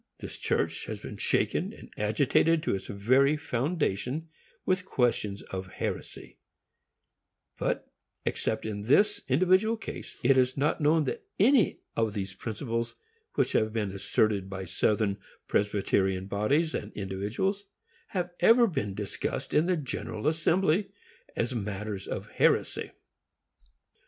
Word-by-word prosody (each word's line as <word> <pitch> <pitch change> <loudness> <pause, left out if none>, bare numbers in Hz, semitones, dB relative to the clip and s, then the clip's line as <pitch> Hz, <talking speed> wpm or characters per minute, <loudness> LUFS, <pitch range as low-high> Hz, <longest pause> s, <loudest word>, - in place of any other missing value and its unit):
This - - -7
church - - 0
has - - -4
been - - -8
shaken - - +1
and - - -13
agitated 140 +9 +2
to - - +1
its 95 -1 -4
very 130 +9 +3
foundation 145 - -1 0.4
with 185 0 +1
questions 120 - 0
of 95 0 -6
heresy; - - -5 1.2
but, - - -1 0.4
except 110 - -1
in 105 -1 -4
this 205 - +4
individual 185 - +4
case, 220 - -7
it 130 +2 +5
is 130 +1 +2
not 145 +3 +1
known 155 +2 +4
that 135 - -4
any 235 +2 +4
of 110 -2 0
these 95 -2 -3
principles 115 +3 -3 0.4
which - - +2
have 110 0 +1
been 105 -4 -1
asserted 100 0 +1
by 95 -1 -5
Southern 100 +2 +1 0.3
Presbyterian 95 -2 +1
bodies 135 +12 +1
and - - -4
individuals 105 - -2 0.4
have 180 -3 -2
ever 235 +1 +7
been 135 - -2
discussed 105 -1 -4
in 160 +4 +3
its 170 -5 +1
General 115 -4 -4
Assembly 170 +4 +2 0.5
as 120 +2 -1
matters 105 -2 -4
of - - -4
heresy. - - +2
120 Hz, 130 wpm, -29 LUFS, 100-165 Hz, 1.2 s, ever